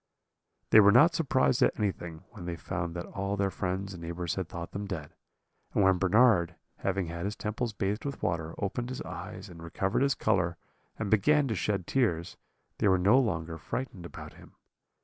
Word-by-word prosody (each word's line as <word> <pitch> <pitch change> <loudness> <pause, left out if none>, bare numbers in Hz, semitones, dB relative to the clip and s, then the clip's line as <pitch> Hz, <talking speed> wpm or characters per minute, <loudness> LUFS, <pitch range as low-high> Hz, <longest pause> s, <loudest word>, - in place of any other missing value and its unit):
"They 110 - +9
were 100 -1 +8
not 150 +10 +6
surprised 130 -5 +2
at - - +3
anything, 90 -5 -3
when 100 -7 -9
they 85 -1 -3
found 85 +1 -4
that 85 - -4
all 100 +1 -3
their 100 -1 +1
friends 95 +2 -3
and 90 - -9
neighbours 85 0 -3
had 95 -3 -4
thought 85 0 -6
them 100 0 -5
dead; 80 -8 -6 0.6
and 100 - +4
when 95 -1 +4
Bernard, 95 -3 +4 0.2
having 100 -1 -1
had 85 +2 -5
his 105 +1 -2
temples 110 +2 -3
bathed 105 +1 -2
with 140 -2 -5
water, 80 -2 -1
opened 120 +5 -3
his 130 - -5
eyes 95 +2 -7
and 85 -3 -12
recovered 95 +6 -1
his 140 -1 +3
colour, 90 -5 +1 0.4
and 110 -3 -3
began 145 +7 +4
to 110 - 0
shed 100 -1 -1
tears, 90 -10 0 0.4
they - - +3
were 95 -1 +5
no 100 +8 +5
longer 85 -9 -2
frightened 100 -2 -5
about - - -10
him. - - -16
95 Hz, 190 wpm, -29 LUFS, 85-110 Hz, 0.6 s, They